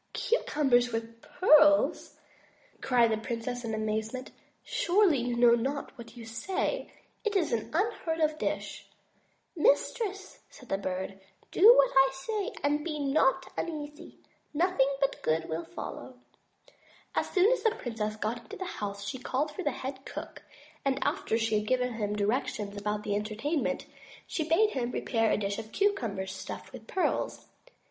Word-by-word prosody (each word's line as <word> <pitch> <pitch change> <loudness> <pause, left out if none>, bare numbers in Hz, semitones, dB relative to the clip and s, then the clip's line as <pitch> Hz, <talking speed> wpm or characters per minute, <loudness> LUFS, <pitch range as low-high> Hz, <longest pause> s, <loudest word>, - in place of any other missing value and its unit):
"Cucumbers 265 - +2
with 230 0 -5
pearls!" 300 -4 +4 0.6
cried 240 -3 +3
the 220 - +1
princess 240 +2 -4
in 225 -1 -2
amazement. 220 +4 -3 0.3
"Surely, 355 -5 +3
you 240 0 -1
know 235 0 +6
not 270 +5 -1
what 235 -1 -12
you 230 - -8
say. 375 - -2 0.3
It 430 -2 -1
is 350 -9 +1
an 220 -2 -1
unheard 335 -3 -1
of 310 -1 +1
dish." - - -3 0.7
"Mistress," 390 - +1
said 255 - -15
the 195 - 0
Bird, 190 0 -4 0.3
"do 420 +6 +8
what - - +5
I 270 0 +7
say, 400 +9 -3
and 295 +1 +1
be 310 -2 -3
not 270 -2 +1
un 340 - -2
easy. 295 -1 -8 0.4
Nothing 330 -4 +3
but 275 0 0
good 160 +1 0
will 165 +1 -3
follow." 170 +9 -7 1.0
As - - 0
soon 390 +4 +4
as - - +1
the 450 - +4
princess 225 - -4
got 220 +2 -2
into 220 - -10
the 375 - -4
house 200 - -5
she 255 +5 -4
called 280 +4 -1
for 375 - -6
the 295 - +1
head 265 0 -6
cook; - - -8 0.4
and 270 -1 +1
after 225 - 0
she 225 -2 +1
had 210 - -6
given 250 0 +1
him 210 -2 -2
directions 210 -1 -1
about 210 +1 -2
the 205 -1 -1
entertainment, 220 +9 -1 0.4
she 315 -1 -3
bade 420 +6 +4
him 245 -3 -2
prepare 225 -2 0
a - - +2
dish 200 0 -2
of 220 0 -8
cucumbers 225 - 0
stuffed 190 - -8
with - - -10
pearls. 375 - -1
255 Hz, 160 wpm, -29 LUFS, 220-310 Hz, 1.0 s, do